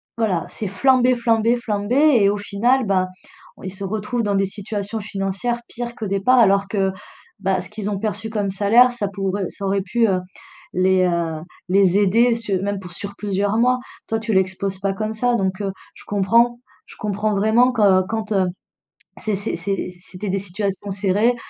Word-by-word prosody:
voilà, 205 -8 0
c'est 215 - -5
flamber, 255 +5 +3
flamber, 230 0 +2
flamber 210 -1 -2 0.3
et 200 - +5
au 205 - 0
final, 225 +6 +1
ben, 190 -2 +1 0.6
ils 185 0 -5
se 195 - -8
retrouvent 215 +5 -2
dans 205 -1 0
des 195 0 +2
situations 205 +2 -5
financières 200 +3 -2
pires 240 0 -6
qu'au 220 - -5
départ, 200 +6 +2
alors 200 -3 +4
que, 195 -2 0 0.5
bah, 190 -1 0
ce 180 - -10
qu'ils 210 -1 -4
ont 205 - -2
perçu 220 +1 -3
comme 210 -3 -1
salaire 210 +6 +5
ça 240 -4 -3
pourrait 195 -1 -2
ça 200 - -7
aurait 195 0 +1
pu, 225 +5 +1
heu, 190 -2 +1 0.5
les, 185 0 +3
heu, 170 -3 -1 0.3
les 195 0 +4
aider 230 +5 +4
su 210 -4 -2
même 200 0 -2
pour 180 -2 -10
sur 200 +3 -7
plusieurs 205 +1 -1
mois. 250 +2 +3 0.3
Toi 225 - -1
tu 220 0 -2
l'exposes 190 0 0
pas 195 0 -1
comme 215 +2 -3
ça 245 +2 +1
donc, 190 -2 -1
heu, 195 -1 -1 0.2
je - - -14
comprends. 230 +4 +2 0.3
Je - - -14
comprends 210 0 -1
vraiment 220 +5 +4
que 200 -5 +4
quand, 220 0 -4
heu, 190 -2 +2 0.7
c'est 215 -2 -2
c'est 200 +3 -3
c'est 195 +3 -2
c'était 180 +2 -8
des 195 +1 0
situations 200 +1 -4
serrées, 205 +5 +2
200 Hz, 185 wpm, -21 LUFS, 195-225 Hz, 0.7 s, et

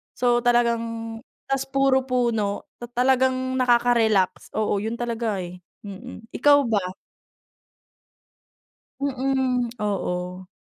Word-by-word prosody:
So 240 0 +2
talagang 240 -1 +3 0.7
tas 270 0 0
puro 270 -1 +2
puno 235 -5 -1
ta 240 - -7 0.2
talagang 260 0 +2
nakaka-relax. 235 -6 +2
Oo 215 -1 +1
'yun 220 +3 -3
talaga 230 -4 -2
eh, 180 +1 -9 0.2
mm. 225 +3 -10
Ikaw 290 +3 +6
ba? 205 -4 +1 2.2
Mm, 260 -2 0
oo. 180 -3 -3
240 Hz, 95 wpm, -24 LUFS, 210-260 Hz, 2.2 s, Ikaw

